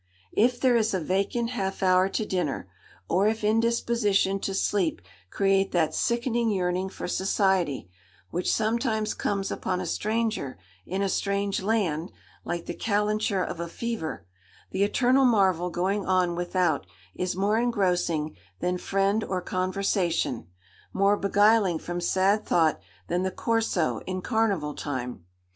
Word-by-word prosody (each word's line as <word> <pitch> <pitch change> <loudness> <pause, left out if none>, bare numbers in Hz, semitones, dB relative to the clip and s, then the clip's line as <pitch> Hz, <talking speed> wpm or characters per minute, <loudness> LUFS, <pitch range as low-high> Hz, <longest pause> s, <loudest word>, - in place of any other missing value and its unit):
If 245 +3 +3
there 255 -2 +4
is 220 -3 +2
a - - +1
vacant 200 +8 -1
half 195 -5 -3
hour 185 0 +4
to 215 - -2
dinner, 180 - -2 0.4
or 190 +4 +2
if 220 0 -1
indisposition 220 -3 +2
to 195 - -3
sleep 190 - +1 0.3
create 195 - +1
that 165 -3 +2
sickening 235 -1 0
yearning 185 -1 0
for - - -6
society, 190 - +1 0.4
which 180 +1 0
sometimes 220 -1 0
comes 200 -1 -2
upon 185 -1 -2
a 185 - -3
stranger 215 - -1 0.3
in 190 +2 -1
a - - +1
strange 200 +1 -1
land, 190 -6 0 0.3
like 175 -1 -4
the - - -4
calenture 210 -2 0
of 175 - -5
a 170 - -3
fever,—the 155 - -5
eternal 255 +6 +3
marvel 190 -8 +3
going 190 +4 -1
on 185 -2 +2
without 175 - 0 0.3
is 180 0 -2
more 205 +4 +2
engrossing 180 -9 0 0.2
than 180 0 -1
friend 195 +3 +1
or 185 - -2
conversation, 185 - -1 0.5
more 200 +1 +3
beguiling 205 -2 +3
from 175 +2 -5
sad 195 +4 +2
thought 160 -3 +2 0.3
than 175 +1 0
the 190 - 0
Corso 220 -5 0
in 185 0 -3
carnival 200 -10 0
time. 125 - -5
195 Hz, 140 wpm, -26 LUFS, 175-215 Hz, 0.5 s, there